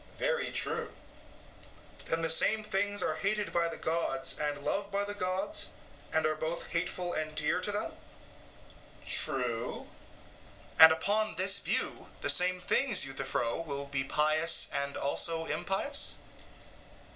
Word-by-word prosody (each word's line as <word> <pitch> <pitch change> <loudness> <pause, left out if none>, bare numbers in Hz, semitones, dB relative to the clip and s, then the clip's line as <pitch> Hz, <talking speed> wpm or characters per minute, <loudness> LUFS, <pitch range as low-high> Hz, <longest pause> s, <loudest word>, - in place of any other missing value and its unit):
EUTHYPHRO: - - -20
Very - - 0
true. - - -2 1.1
SOCRATES: - - -13
Then 165 0 0
the 165 - +1
same 215 +6 +3
things 205 0 -1
are - - -1
hated 210 +1 -1
by 170 -1 +2
the - - -7
gods 170 +1 -1
and 150 -1 -1
loved 200 +5 -1
by 200 0 -1
the 205 0 -4
gods, 190 0 -1 0.4
and 160 - +2
are 155 - +2
both 160 +2 -4
hateful 175 +1 -2
and 155 0 -3
dear 150 +4 +2
to 205 - -1
them? 205 +1 -2 1.1
EUTHYPHRO: - - -19
True. 125 -6 -1
SOCRATES: - - -18
And 160 0 +12
upon 205 +7 +1
this 190 +2 +3
view - - -1
the - - +4
same 180 0 +3
things, 245 - +2
Euthyphro, 130 -3 -2
will 140 -3 -4
be 140 -1 -2
pious 155 +4 +2
and 140 0 -2
also 165 +3 0
impious? 195 - -1
170 Hz, 150 wpm, -31 LUFS, 155-200 Hz, 1.1 s, And